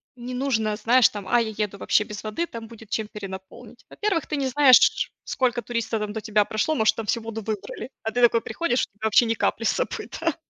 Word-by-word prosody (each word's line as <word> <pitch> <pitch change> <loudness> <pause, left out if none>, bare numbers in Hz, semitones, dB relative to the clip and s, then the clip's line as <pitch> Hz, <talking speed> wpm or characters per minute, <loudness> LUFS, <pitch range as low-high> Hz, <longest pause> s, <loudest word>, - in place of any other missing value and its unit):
не 250 0 -7
нужно, 235 -5 0
знаешь, 240 +2 +5
там: 205 -2 -8
"А, 240 - +3
я 220 -1 -3
еду 210 -2 -2
вообще 210 - +2
без 210 -2 -8
воды, 215 +11 -2
там 230 -5 -8
будет 225 -2 -14
чем 220 -1 -2
перенаполнить". 190 -2 -10
Во-первых, 405 -6 -1
ты 300 - -2
не 275 -1 0
знаешь, 260 -1 +5
сколько 245 -2 0
туристов 230 -1 -2
там 210 -1 -3
до 220 - -4
тебя 210 -1 +2
прошло, 220 +10 0
может, 220 -5 +3
там 225 - -5
всю 230 +3 0
воду 225 0 -6
выбрали, 215 +3 -5
а 220 - -2
ты 245 - -1
такой 235 -1 +5
приходишь, 250 +2 -1
у 205 - -8
тебя 220 - -5
вообще 220 +3 +5
ни 225 - +1
капли 225 0 -1
с - - +4
собой, - - -2
да. 330 -2 0
225 Hz, 235 wpm, -24 LUFS, 215-250 Hz, -, знаешь